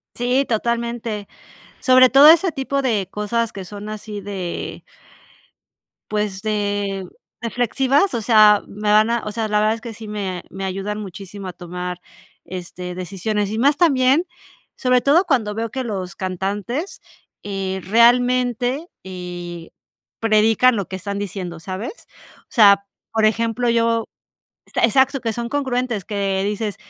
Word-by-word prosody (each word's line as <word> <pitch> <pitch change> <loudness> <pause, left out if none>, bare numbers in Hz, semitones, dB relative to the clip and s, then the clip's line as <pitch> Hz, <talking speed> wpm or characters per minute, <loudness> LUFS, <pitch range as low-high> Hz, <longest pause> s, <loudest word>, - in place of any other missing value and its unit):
Sí, 250 +3 +1
totalmente. 235 -2 -2 0.5
Sobre 255 -1 +6
todo 275 +4 +8
ese 340 +2 +6
tipo 275 -1 -2
de 215 -8 0
cosas 220 +3 -1
que 195 - -7
son 205 +2 -8
así 215 -1 -6
de 190 -3 -5 1.3
pues, 210 -2 -2
de 205 -2 -1 0.4
reflexivas, 255 - +1
o 235 - -1
sea, 215 -2 +6
me 210 +1 -3
van 215 +2 +5
a 235 -1 0
o 210 - -4
sea, 220 +1 -2
la 210 0 +1
verdad 215 +1 +2
es - - -13
que 225 0 -8
sí 220 0 -10
me 195 -4 -4
me 195 +1 -6
ayudan 195 +2 -3
muchísimo 195 0 -8
a - - -5
tomar, 180 +1 -6 0.4
este, 180 0 -7
decisiones. 195 +3 -2
Y 220 - -3
más 280 +4 +3
también, 280 -1 +3 0.5
sobre 250 -1 +2
todo 315 +7 +4
cuando 225 -9 +1
veo 225 +1 -3
que 260 +3 -3
los 190 -6 -4
cantantes, 200 - -3 0.4
eh, 195 -1 -3
realmente, 245 - +3 0.2
eh, 175 -2 -7 0.5
predican 225 +3 +4
lo 200 -3 -2
que 190 - -5
están 200 +2 -5
diciendo, 185 -4 -5
¿sabes? 190 - -7 0.4
O - - -57
sea, 200 -3 +5 0.3
por 220 -1 +3
ejemplo, 230 +2 0
yo 230 -1 +1 0.7
e - - +5
exacto, 265 +3 +2
que 225 -2 -2
son 235 +1 -4
congruentes, 250 -6 -1
que 195 -2 -1
dices 210 0 -2
215 Hz, 145 wpm, -21 LUFS, 195-245 Hz, 1.3 s, todo